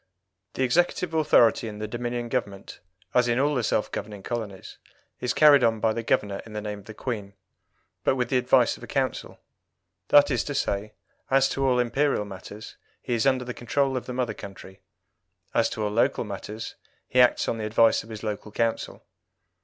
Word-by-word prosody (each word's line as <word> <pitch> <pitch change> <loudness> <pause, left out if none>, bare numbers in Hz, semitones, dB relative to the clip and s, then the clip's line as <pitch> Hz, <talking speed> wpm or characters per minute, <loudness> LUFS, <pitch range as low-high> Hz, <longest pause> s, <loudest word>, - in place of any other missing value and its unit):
The 130 - 0
executive 175 +5 +1
authority 135 -8 +4
in 105 -1 -7
the 110 0 -4
Dominion 120 +1 -3
Government, 100 -4 -4 0.3
as 125 -1 +3
in 120 0 +1
all 145 +3 +2
the 125 - +1
self 110 -1 0
governing 105 -2 -6
colonies, 110 -5 -6 0.4
is 125 - -1
carried 145 -3 +6
on 115 -1 +2
by 110 0 +2
the 115 - -3
Governor 100 -3 0
in 110 - -12
the 105 - -3
name 105 -1 -5
of 100 - -17
the 110 - -10
Queen, 105 -6 -5 0.7
but - - +2
with 125 -2 -1
the 130 - +3
advice 125 - +3
of - - -18
a - - -9
Council: - - -2 0.7
that 145 0 +6
is 125 - +1
to 145 - -4
say, 105 -5 -2 0.4
as 135 0 +4
to 135 - -2
all 125 -1 +3
Imperial 125 -1 +1
matters, 100 +2 -10 0.2
he - - -4
is 115 +3 +2
under 130 -2 +2
the 125 - -5
control 135 +3 0
of 125 - -4
the 125 - -4
mother 125 -3 -1
country; 95 -2 -11 0.7
as - - +2
to 110 - -4
all 105 - -1
local 115 +3 +1
matters, 110 +2 -7 0.3
he 125 - +4
acts 125 - +3
on 115 - -1
the 110 - -3
advice 115 +1 +4
of 110 - -15
his 110 -1 -8
local 105 0 -4
Council. 115 +1 -2
115 Hz, 200 wpm, -26 LUFS, 105-130 Hz, 0.7 s, carried